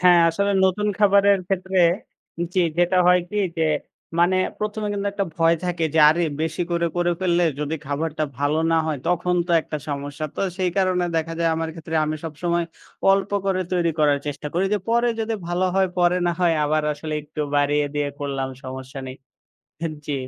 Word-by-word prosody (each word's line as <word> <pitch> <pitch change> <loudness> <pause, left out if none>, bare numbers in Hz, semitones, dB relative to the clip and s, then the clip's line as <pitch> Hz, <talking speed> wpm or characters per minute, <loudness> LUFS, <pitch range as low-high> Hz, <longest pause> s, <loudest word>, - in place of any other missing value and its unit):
হ্যাঁ, 180 -1 +6
আসলে 200 +4 0
নতুন 200 +3 +1
খাবারের 200 -1 +5
ক্ষেত্রে, 190 0 -1 0.8
জি, 185 - +3 0.2
যেটা 175 +1 +3
হয় 180 0 +6
কি 210 - -4 0.2
যে, 165 - 0 0.6
মানে 175 +2 +4 0.2
১ম 210 0 -3
এ - - -1
কিন্তু 200 0 -2
একটা 200 -1 -1
ভয় 165 0 +4
থাকে 175 -2 -1
যে - - +3
আরে! 170 +3 +2 0.2
বেশি 160 +2 -1
করে, 170 0 +1
করে 175 0 +2
ফেললে 175 -1 +2 0.2
যদি 150 +2 -2
খাবারটা 155 +2 -2
ভালো 145 +2 +1
না - - +4
হয় 150 -3 -1
তখন 180 0 +1
তো - - -5
একটা 155 - -5
সমস্যা। 145 +1 -4
তো - - -3 0.2
সেই 180 -1 +1
কারণে 185 -2 +2
দেখা 165 0 -1
যায় 165 -1 +3
আমার 165 0 -2
ক্ষেত্রে 160 0 -7
আমি 155 0 -2
সবসময়, 170 +2 -1 0.5
অল্প 195 0 0 0.2
করে 185 -1 +1
তৈরি 175 -2 +2
করার 145 -2 +3
চেষ্টা 145 +1 -4
করি 180 +3 +2
যে - - +1
পরে 235 +1 +3
যদি 225 0 -1
ভালো 175 +2 0
হয়, 190 0 +3
পরে 175 0 +3
না - - +3
হয় 170 -2 +3
আবার 155 +1 +1
আসলে 155 +1 -5
একটু 150 +1 -7
বাড়িয়ে 145 0 +2
দিয়ে 145 -1 0
করলাম 135 -2 -3 0.2
সমস্যা 130 +1 -7
নেই। 130 0 -7 0.7
হ্যাঁ, 165 -2 -2
জি। 145 - -1
170 Hz, 190 wpm, -23 LUFS, 150-185 Hz, 0.8 s, হ্যাঁ